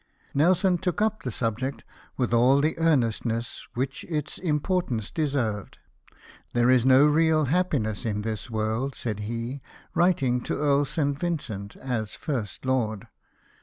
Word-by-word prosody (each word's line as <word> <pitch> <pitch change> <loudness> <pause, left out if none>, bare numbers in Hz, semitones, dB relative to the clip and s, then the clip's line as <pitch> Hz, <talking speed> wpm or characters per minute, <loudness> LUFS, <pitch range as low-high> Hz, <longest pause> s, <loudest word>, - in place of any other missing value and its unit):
Nelson 180 +4 +3
took 180 +1 -1
up 215 0 +1
the 125 - -3
subject 125 +4 -2 0.3
with 125 -2 0
all 125 +4 +5
the 155 +3 +1
earnestness 120 -7 0
which 130 +2 -2
its 155 -3 -3
importance 150 - -1
deserved. 135 - -1 0.4
" - - -24
There 120 +1 +4
is 130 -1 +4
no 130 +2 +7
real 155 0 +3
happiness 135 - 0
in 105 -3 -2
this 110 +2 -4
world," 110 +4 -1
said 110 -4 -3
he, 115 +5 -4 0.3
writing 140 -9 +2
to - - -2
Earl 145 -1 +3
St. 145 -1 -1
Vincent, 135 - -3
as 115 -5 -3
First 120 - -4
Lord. 115 -6 -1
130 Hz, 140 wpm, -26 LUFS, 115-155 Hz, 0.4 s, no